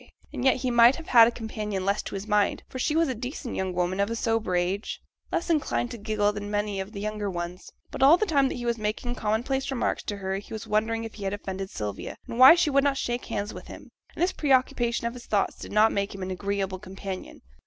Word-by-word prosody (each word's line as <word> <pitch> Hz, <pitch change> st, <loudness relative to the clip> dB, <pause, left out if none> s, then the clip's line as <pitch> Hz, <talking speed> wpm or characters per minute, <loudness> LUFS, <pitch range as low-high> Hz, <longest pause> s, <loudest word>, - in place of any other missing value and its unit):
And 260 Hz, -4 st, -4 dB
yet 265 Hz, -, +5 dB
he 255 Hz, 0 st, -2 dB
might 240 Hz, +2 st, +7 dB
have 330 Hz, -, -9 dB
had 230 Hz, -2 st, +8 dB
a -, -, +1 dB
companion 210 Hz, -4 st, -4 dB
less 200 Hz, +1 st, +1 dB
to -, -, -7 dB
his 195 Hz, +1 st, -5 dB
mind, 210 Hz, -1 st, +1 dB
for 260 Hz, -, -7 dB
she 300 Hz, +4 st, 0 dB
was 330 Hz, 0 st, +3 dB
a 260 Hz, -, -1 dB
decent 250 Hz, +2 st, -6 dB
young 190 Hz, -1 st, -1 dB
woman 180 Hz, +1 st, -1 dB
of 200 Hz, +1 st, +1 dB
a 230 Hz, -, -2 dB
sober 225 Hz, -5 st, 0 dB
age, 180 Hz, +4 st, -1 dB, 0.3 s
less 340 Hz, -, -1 dB
inclined 295 Hz, -7 st, 0 dB
to 235 Hz, -, -7 dB
giggle 210 Hz, -1 st, 0 dB
than 205 Hz, 0 st, -5 dB
many 205 Hz, -1 st, -1 dB
of 190 Hz, +2 st, -5 dB
the 205 Hz, -, -7 dB
younger 210 Hz, 0 st, -3 dB
ones. 175 Hz, 0 st, -6 dB, 0.2 s
But -, -, -6 dB
all 285 Hz, +6 st, +8 dB
the 430 Hz, -, +1 dB
time 280 Hz, -7 st, +3 dB
that -, -, -4 dB
he 240 Hz, -, -5 dB
was 235 Hz, -1 st, 0 dB
making 215 Hz, +3 st, -2 dB
commonplace 245 Hz, +5 st, -1 dB
remarks 265 Hz, -3 st, -1 dB
to 205 Hz, -, -3 dB
her 190 Hz, -1 st, -2 dB
he 200 Hz, -, -9 dB
was 220 Hz, 0 st, -5 dB
wondering 220 Hz, +1 st, 0 dB
if 225 Hz, -, -7 dB
he 205 Hz, -, -9 dB
had 195 Hz, -, -1 dB
offended 195 Hz, -1 st, -5 dB
Sylvia, 105 Hz, -, -5 dB
and 235 Hz, -, -5 dB
why 260 Hz, +6 st, +11 dB
she 345 Hz, -4 st, +2 dB
would 275 Hz, 0 st, +4 dB
not 280 Hz, -1 st, +2 dB
shake 240 Hz, -1 st, -2 dB
hands 205 Hz, +1 st, -3 dB
with -, -, -10 dB
him, -, -, -11 dB, 0.2 s
and -, -, 0 dB
this 365 Hz, -, +2 dB
pre 290 Hz, -3 st, -2 dB
occupation 240 Hz, -2 st, +2 dB
of 235 Hz, -, -1 dB
his 245 Hz, -1 st, -11 dB
thoughts 205 Hz, -2 st, +1 dB
did -, -, -9 dB
not 215 Hz, +1 st, +5 dB
make 200 Hz, 0 st, -2 dB
him 195 Hz, -, -6 dB
an 185 Hz, -, -4 dB
agreeable 195 Hz, 0 st, -2 dB
companion. 190 Hz, -1 st, -8 dB
215 Hz, 260 wpm, -26 LUFS, 200-245 Hz, 0.3 s, why